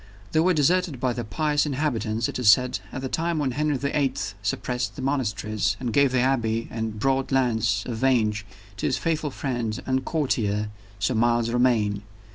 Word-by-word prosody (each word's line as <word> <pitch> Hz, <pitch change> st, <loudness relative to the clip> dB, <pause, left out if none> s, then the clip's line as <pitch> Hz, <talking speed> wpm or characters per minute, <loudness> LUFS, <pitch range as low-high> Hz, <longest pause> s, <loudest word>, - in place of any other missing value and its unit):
They 155 Hz, -, +2 dB
were 180 Hz, +2 st, +3 dB
deserted 165 Hz, -1 st, +2 dB
by 125 Hz, -1 st, 0 dB
the 120 Hz, -, -4 dB
pious 145 Hz, +8 st, 0 dB
inhabitants, 115 Hz, -6 st, -1 dB
it -, -, -4 dB
is 120 Hz, -5 st, +4 dB
said, 125 Hz, -1 st, +4 dB
at 130 Hz, -, -5 dB
the -, -, -1 dB
time 165 Hz, +4 st, -1 dB
when 140 Hz, -4 st, 0 dB
Henry 150 Hz, +2 st, 0 dB
the 140 Hz, +2 st, -2 dB
Eighth 120 Hz, -9 st, 0 dB
suppressed 125 Hz, +4 st, -2 dB
the -, -, -6 dB
monasteries, 110 Hz, -6 st, -1 dB
and 120 Hz, -4 st, -3 dB
gave 140 Hz, -2 st, +4 dB
the 130 Hz, -1 st, +2 dB
Abbey 115 Hz, -3 st, +1 dB
and 110 Hz, -1 st, -3 dB
the -, -, -9 dB
broad 135 Hz, +4 st, 0 dB
lands 120 Hz, -4 st, +1 dB
of 120 Hz, -3 st, -4 dB
Vange 110 Hz, -5 st, +2 dB, 0.3 s
to -, -, -1 dB
his -, -, +1 dB
faithful 160 Hz, -2 st, -1 dB
friend 120 Hz, -5 st, -3 dB
and 130 Hz, 0 st, 0 dB
courtier, 105 Hz, -9 st, 0 dB, 0.3 s
Sir 105 Hz, +6 st, 0 dB
Miles 115 Hz, 0 st, +2 dB
Romayne. 115 Hz, -5 st, +2 dB
125 Hz, 190 wpm, -25 LUFS, 110-140 Hz, 0.3 s, is